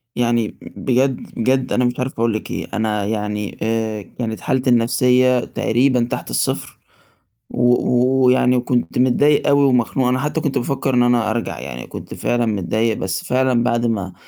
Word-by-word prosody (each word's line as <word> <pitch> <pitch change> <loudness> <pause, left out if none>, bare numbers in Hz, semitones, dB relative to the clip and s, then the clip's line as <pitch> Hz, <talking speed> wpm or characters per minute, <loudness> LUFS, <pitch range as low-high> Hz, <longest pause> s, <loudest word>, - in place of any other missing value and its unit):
يعني 120 -2 0
بجد، 130 0 -1
بجد 130 +2 0
أنا 125 0 +2
مش 125 +1 -2
عارف 130 +1 -2
أقول 115 -1 +1
لِك 110 - -5
إيه، - - -4
أنا 105 -1 -1
يعني 105 -1 -3
آآ 110 -1 -1
كانت 110 +2 -6
حالتي 130 -2 0
النفسية 125 +1 +3
تقريبًا 125 +1 +1
تحت - - -4
الصفر - - -2 0.7
و 120 - -2 0.3
و 130 +1 +2
ويعني 125 0 +3
كنت 120 0 -1
متضايق 135 +4 +3
أوي 140 0 +4
ومخنوق. 125 0 +1
أنا 130 +1 +1
حتى 150 +3 -2
كنت 145 - -1
بافكر 135 +1 -1
إن 125 0 +4
أنا 120 -2 +2
أرجع 115 0 -3
يعني 60 0 -7
كنت - - -9
فعلًا 120 -1 -1
متضايق 110 +2 -1
بس 95 0 -3
فعلًا 125 -2 +1
بعد 120 -1 0
ما 100 -5 -2
120 Hz, 170 wpm, -19 LUFS, 110-130 Hz, 0.7 s, أوي